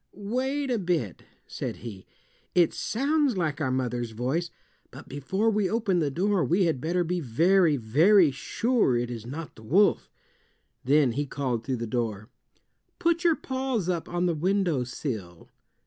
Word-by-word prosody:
"Wait 260 Hz, +7 st, -2 dB
a 235 Hz, -, +1 dB
bit," 170 Hz, -, -2 dB, 0.2 s
said -, -, -5 dB
he. 100 Hz, -5 st, -8 dB, 0.5 s
"It 175 Hz, -3 st, +4 dB
sounds 280 Hz, 0 st, 0 dB
like 155 Hz, -4 st, -1 dB
our 140 Hz, -, 0 dB
mother's 125 Hz, -2 st, -1 dB
voice, 135 Hz, +10 st, -1 dB, 0.4 s
but -, -, -12 dB
before 190 Hz, +11 st, -1 dB
we 205 Hz, -3 st, +1 dB
open 215 Hz, -5 st, +1 dB
the 150 Hz, -3 st, +1 dB
door 185 Hz, +4 st, +1 dB
we 175 Hz, +8 st, +2 dB
had 155 Hz, -7 st, 0 dB
better 175 Hz, +3 st, 0 dB
be 175 Hz, +1 st, -1 dB
very, 165 Hz, +4 st, +3 dB
very 155 Hz, -, +4 dB
sure 220 Hz, -, +1 dB
it 120 Hz, 0 st, -2 dB
is 115 Hz, -1 st, -7 dB
not 155 Hz, +5 st, -7 dB
the -, -, -14 dB
wolf." 185 Hz, -, +2 dB, 0.7 s
Then 140 Hz, -1 st, +3 dB
he 145 Hz, +4 st, -2 dB
called 125 Hz, -5 st, -2 dB
through 130 Hz, +1 st, -2 dB
the 115 Hz, -, -3 dB
door, 110 Hz, -2 st, -3 dB, 0.7 s
"Put 340 Hz, 0 st, +1 dB
your 335 Hz, -2 st, +4 dB
paws 260 Hz, -, -2 dB
up 170 Hz, -3 st, -2 dB
on 175 Hz, +1 st, -1 dB
the 175 Hz, -, +2 dB
windowsill." 140 Hz, -, -2 dB
165 Hz, 160 wpm, -27 LUFS, 125-200 Hz, 0.7 s, It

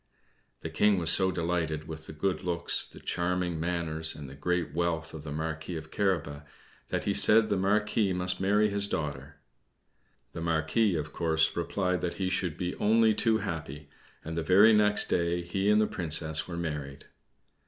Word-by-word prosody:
The 80 Hz, -, -5 dB
King 100 Hz, +5 st, +3 dB
was 85 Hz, -2 st, +2 dB
so 95 Hz, -1 st, +4 dB
delighted 80 Hz, -3 st, -2 dB
with 80 Hz, -1 st, -8 dB
the -, -, -7 dB
good 90 Hz, +5 st, -2 dB
looks, 85 Hz, -1 st, -1 dB
the -, -, -14 dB
charming 90 Hz, -1 st, -2 dB
manners, 80 Hz, -2 st, -1 dB
and 75 Hz, -2 st, -8 dB
the 65 Hz, -, -10 dB
great 85 Hz, +1 st, -2 dB
wealth 80 Hz, -1 st, -2 dB
of 80 Hz, -, -7 dB
the 75 Hz, -, -7 dB
Marquis 80 Hz, +2 st, -4 dB
of 80 Hz, -1 st, -8 dB
Carabas, 80 Hz, -8 st, -1 dB, 0.5 s
that -, -, -2 dB
he -, -, 0 dB
said 110 Hz, 0 st, +5 dB
the 100 Hz, -, +1 dB
Marquis 105 Hz, +1 st, +1 dB
must 90 Hz, 0 st, -1 dB
marry 105 Hz, +2 st, +3 dB
his 100 Hz, 0 st, +1 dB
daughter. 75 Hz, -4 st, -4 dB, 1.0 s
The 85 Hz, -, -6 dB
Marquis, 85 Hz, +5 st, +1 dB
of 75 Hz, -1 st, -4 dB
course, 80 Hz, -1 st, +1 dB
replied 90 Hz, +1 st, -1 dB
that 85 Hz, 0 st, -3 dB
he 95 Hz, -1 st, -2 dB
should 90 Hz, -4 st, -1 dB
be 90 Hz, -1 st, -3 dB
only 110 Hz, +1 st, +3 dB
too 110 Hz, +1 st, +2 dB
happy; 75 Hz, -7 st, -6 dB, 0.3 s
and 80 Hz, +1 st, -5 dB
the 85 Hz, -, -1 dB
very 100 Hz, +7 st, +6 dB
next 105 Hz, -1 st, +3 dB
day 85 Hz, 0 st, 0 dB
he 95 Hz, +4 st, -1 dB
and 105 Hz, 0 st, +5 dB
the 110 Hz, -, +3 dB
Princess 80 Hz, -4 st, 0 dB
were 85 Hz, -2 st, -6 dB
married. 75 Hz, -4 st, -5 dB
85 Hz, 180 wpm, -28 LUFS, 80-95 Hz, 1.0 s, very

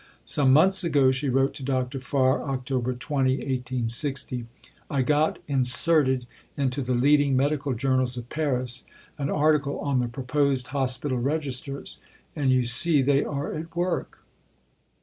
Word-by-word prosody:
"Some 135 Hz, -3 st, +2 dB
months 190 Hz, +7 st, +5 dB
ago," 140 Hz, -6 st, +3 dB
she 130 Hz, +2 st, -1 dB
wrote 135 Hz, +2 st, +2 dB
to 135 Hz, -, -6 dB
Dr. 130 Hz, 0 st, -2 dB
Farr 130 Hz, 0 st, +1 dB
(Oct. 130 Hz, -3 st, -4 dB, 0.3 s
20, 130 Hz, +1 st, 0 dB
1860), 125 Hz, -1 st, -3 dB, 0.4 s
"I 140 Hz, -3 st, 0 dB
got 150 Hz, +3 st, +1 dB
inserted 130 Hz, 0 st, +2 dB, 0.3 s
into 135 Hz, -1 st, -1 dB
the 125 Hz, -1 st, -1 dB
leading 140 Hz, +1 st, +3 dB
medical 140 Hz, 0 st, 0 dB
journals 130 Hz, 0 st, 0 dB
of 120 Hz, -1 st, -6 dB
Paris 130 Hz, -4 st, -2 dB, 0.4 s
an 140 Hz, 0 st, -2 dB
article 150 Hz, -1 st, +1 dB
on 140 Hz, -3 st, 0 dB
the 125 Hz, -, 0 dB
proposed 135 Hz, +1 st, -1 dB
Hospital 130 Hz, -1 st, -1 dB
Registers; 140 Hz, 0 st, -3 dB, 0.4 s
and 140 Hz, -3 st, 0 dB
you 130 Hz, -1 st, +3 dB
see 135 Hz, +5 st, +5 dB
they 140 Hz, +1 st, +3 dB
are 145 Hz, 0 st, -4 dB
at 165 Hz, +2 st, -7 dB
work." 175 Hz, +1 st, -3 dB
135 Hz, 140 wpm, -25 LUFS, 130-145 Hz, 0.4 s, months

